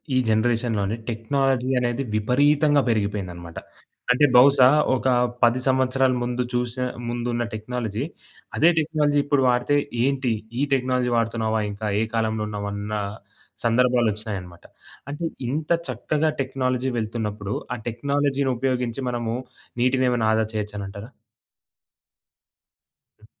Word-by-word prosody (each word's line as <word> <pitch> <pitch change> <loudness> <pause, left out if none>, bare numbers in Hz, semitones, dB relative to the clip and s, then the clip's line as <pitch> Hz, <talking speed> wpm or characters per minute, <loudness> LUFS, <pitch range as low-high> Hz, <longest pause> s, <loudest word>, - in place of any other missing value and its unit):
ఈ - - +4
జనరేషన్‌లోనే 110 -2 +1
టెక్నాలజీ 130 +3 0
అనేది 120 +2 -1
విపరీతంగా 145 +6 +3
పెరిగిపోయిందనమాట. 95 -6 -3 0.5
అంటే 125 +4 +5
బహుశా 135 0 +7 0.3
ఒక 130 - -1 0.4
10 120 +2 +4
సంవత్సరాల 130 0 +2
ముందు 125 +1 -1
చూసి 120 +1 -1 0.3
ముందున్న 120 0 -2
టెక్నాలజీ 110 0 -3 0.5
అదే 165 - +6
టెక్నాలజీ 150 -2 +1
ఇప్పుడు 145 -1 +1
వాడితే 125 +3 +2 0.3
ఏంటి? 135 -2 +1 0.3
ఈ - - +1
టెక్నాలజీ 125 -1 +1
వాడుతున్నావా 110 -1 0
ఇంకా? 105 +2 -5
ఏ - - +2
కాలంలో 110 -1 0
ఉన్నావన్న 100 0 -4 0.7
సందర్భాలొచ్చినాయనమాట. 110 -7 0 0.5
అంటే 150 +4 -4 0.2
ఇంత 150 +5 -3 0.2
చక్కగా 155 +1 0
టెక్నాలజీ 130 -1 -1
వెళ్తున్నప్పుడు 105 -2 -3 0.2
ఆ - - -6
టెక్నాలజీనుపయోగించి 135 -1 -1
మనము 120 -2 -2 0.5
నీటినేమైనా 125 -2 +2
ఆదా 110 0 +2
చేయొచ్చనంటారా? 105 0 -5 2.1
హ్మ్. - - -18
120 Hz, 105 wpm, -23 LUFS, 110-130 Hz, 2.1 s, బహుశా